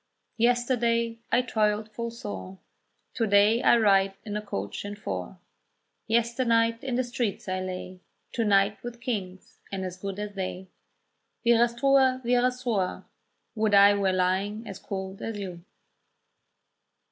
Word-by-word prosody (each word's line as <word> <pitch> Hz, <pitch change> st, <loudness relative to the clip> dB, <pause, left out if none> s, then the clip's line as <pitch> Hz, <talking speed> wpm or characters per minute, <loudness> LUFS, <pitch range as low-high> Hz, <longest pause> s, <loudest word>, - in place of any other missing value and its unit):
Yesterday 235 Hz, -1 st, +1 dB
I 250 Hz, -, +3 dB
toiled 215 Hz, -2 st, 0 dB
full 235 Hz, +2 st, -4 dB
sore, 95 Hz, -, -7 dB, 0.6 s
To 225 Hz, -, 0 dB
day 205 Hz, +3 st, +4 dB
I -, -, +5 dB
ride 195 Hz, -3 st, +3 dB
in 210 Hz, -1 st, -4 dB
a 210 Hz, -, -1 dB
coach 100 Hz, -, -5 dB
and 205 Hz, 0 st, -6 dB
four. 210 Hz, -, -5 dB, 0.7 s
Yesternight 230 Hz, 0 st, +2 dB
in 260 Hz, -2 st, -2 dB
the 255 Hz, -, +1 dB
streets 240 Hz, -5 st, -3 dB
I 185 Hz, 0 st, -1 dB
lay, 185 Hz, 0 st, -6 dB, 0.3 s
To 235 Hz, -, -1 dB
night 200 Hz, 0 st, +3 dB
with 240 Hz, -1 st, -7 dB
kings, 195 Hz, -6 st, -5 dB
and 190 Hz, -1 st, -3 dB
as 180 Hz, 0 st, -6 dB
good 195 Hz, +1 st, -5 dB
as 210 Hz, 0 st, -5 dB
they." 190 Hz, -1 st, -5 dB, 0.8 s
Wirastrua! 255 Hz, +3 st, +3 dB
wirastrua! 245 Hz, -5 st, 0 dB, 0.5 s
would 215 Hz, -2 st, +2 dB
I 200 Hz, +1 st, +8 dB
were 200 Hz, -2 st, +1 dB
lying 190 Hz, +4 st, 0 dB
as 195 Hz, -, -7 dB
cold 190 Hz, -1 st, -6 dB
as 225 Hz, -2 st, -4 dB
you. 180 Hz, -4 st, -7 dB
210 Hz, 135 wpm, -27 LUFS, 195-235 Hz, 0.8 s, I